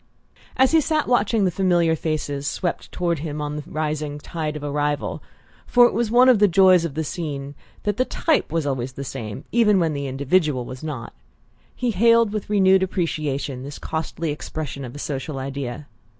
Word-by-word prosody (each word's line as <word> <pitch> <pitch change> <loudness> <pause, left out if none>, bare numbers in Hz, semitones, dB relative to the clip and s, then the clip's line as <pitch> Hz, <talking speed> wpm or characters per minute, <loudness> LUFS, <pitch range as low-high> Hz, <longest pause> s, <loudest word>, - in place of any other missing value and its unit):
As 260 0 +4
he 320 -1 +5
sat 310 0 0
watching 225 -3 +2
the 180 - +2
familiar 175 -3 +2
faces 145 -3 -3
swept 175 - -3
toward 170 -3 -1
him 150 -1 -4
on 150 0 -3
the 150 - -5
rising 150 -1 -3
tide 155 0 -4
of 150 - -6
arrival 145 0 -1 0.5
for 245 0 +6
it - - +2
was 235 0 0
one 245 +3 +6
of 250 -5 +6
the 205 - +6
joys 185 -1 +5
of 150 -4 -5
the 160 - -1
scene 145 -4 -5 0.3
that 205 0 -1
the 255 - +2
type 320 - 0
was 165 -2 0
always 130 -2 -2
the 140 - -6
same 115 -6 -6
even 210 -4 +4
when 165 -3 +1
the 140 -1 -3
individual 140 0 +1
was 130 +3 -9
not 145 -7 -5 0.6
he 245 -1 0
hailed 230 +1 +4
with 215 -2 -4
renewed 190 -2 +4
appreciation 150 -8 -2
this 140 +2 -7
costly 160 0 -3
expression 150 -1 -5
of 125 0 -8
a - - -6
social 140 0 -4
ideal. 135 0 -5
155 Hz, 190 wpm, -23 LUFS, 140-195 Hz, 0.6 s, for